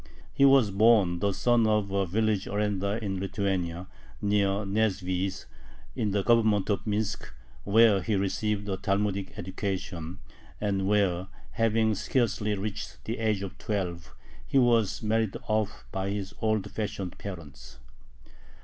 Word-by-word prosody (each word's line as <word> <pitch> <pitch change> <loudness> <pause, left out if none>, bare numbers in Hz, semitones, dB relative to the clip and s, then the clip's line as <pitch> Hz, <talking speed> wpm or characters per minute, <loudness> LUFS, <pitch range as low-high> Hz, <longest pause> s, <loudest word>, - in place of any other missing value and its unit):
He 140 - +4
was 135 -6 +5
born 100 -4 +4
the 100 +1 +1
son 120 +3 +2
of 105 -2 +1
a 100 -1 +1
village 105 +1 0
arendar 100 0 -1
in 100 -4 -3
Lithuania, 95 -3 -2 0.3
near 100 0 +1
Nesvizh, 95 -2 -1 0.5
in 105 - 0
the 100 0 0
Government 110 -3 +3
of 100 - -2
Minsk, 105 0 -2 0.3
where 105 -1 +5
he 105 +3 0
received 100 +1 -1
a 95 -2 -1
Talmudic 100 0 -1
education, 95 -3 -4 0.4
and 100 -2 0
where, 95 -3 +2 0.2
having 110 -1 +2
scarcely 105 -1 0
reached 100 -5 -5
the 115 +1 -3
age 110 -3 0
of 95 -1 -7
twelve, 90 -4 -3 0.3
he - - +1
was 115 -5 +3
married 110 -1 0
off 110 -1 -1
by 95 0 -2
his 100 -1 -4
old 110 -2 0
fashioned 105 -4 -4
parents. 80 -8 -9
100 Hz, 135 wpm, -28 LUFS, 95-110 Hz, 0.5 s, was